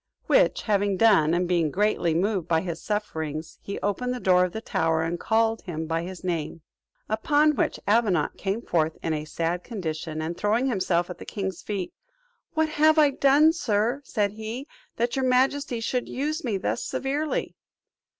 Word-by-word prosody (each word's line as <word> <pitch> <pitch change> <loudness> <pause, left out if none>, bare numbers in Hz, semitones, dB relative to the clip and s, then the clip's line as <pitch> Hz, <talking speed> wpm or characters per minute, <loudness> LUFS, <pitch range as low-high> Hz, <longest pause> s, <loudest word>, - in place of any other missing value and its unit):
Which - - +3
having 205 -2 +1
done, 180 -7 +4
and 180 0 0
being 170 -3 +2
greatly 180 -2 +1
moved 190 -1 0
by 165 -2 +2
his 170 -2 -5
sufferings, 160 -7 -4
he 200 - -5
opened 250 +5 -1
the - - -5
door 180 -4 +4
of 180 - -1
the 220 - -4
tower, 160 -6 0
and 170 +1 -2
called 225 0 +1
him 160 -4 -5
by 165 +1 -1
his 185 +1 -8
name. 165 -3 -3 0.5
Upon 295 +7 +2
which - - 0
Avenant 205 -7 +2
came 200 +4 -3
forth 160 -1 0
in 165 - 0
a 150 0 -3
sad 170 +3 -2
condition, 160 -7 -4
and, 160 +2 -3
throwing 215 +7 +1
himself 185 -7 0
at - - -9
the - - -7
king's 190 -4 -4
feet, 195 -4 -4 0.6
"What 315 0 +2
have 310 +1 +4
I 295 -2 +6
done, 280 +4 +5
sir," 235 -2 0
said 210 -6 0
he, 220 +6 -6 0.3
"that 235 +1 -1
your 265 -1 0
majesty 255 0 +2
should 245 +2 -2
use 305 +5 -2
me 225 -6 -1
thus 195 - -2
severely?" 285 +3 -2
205 Hz, 180 wpm, -26 LUFS, 170-250 Hz, 0.6 s, I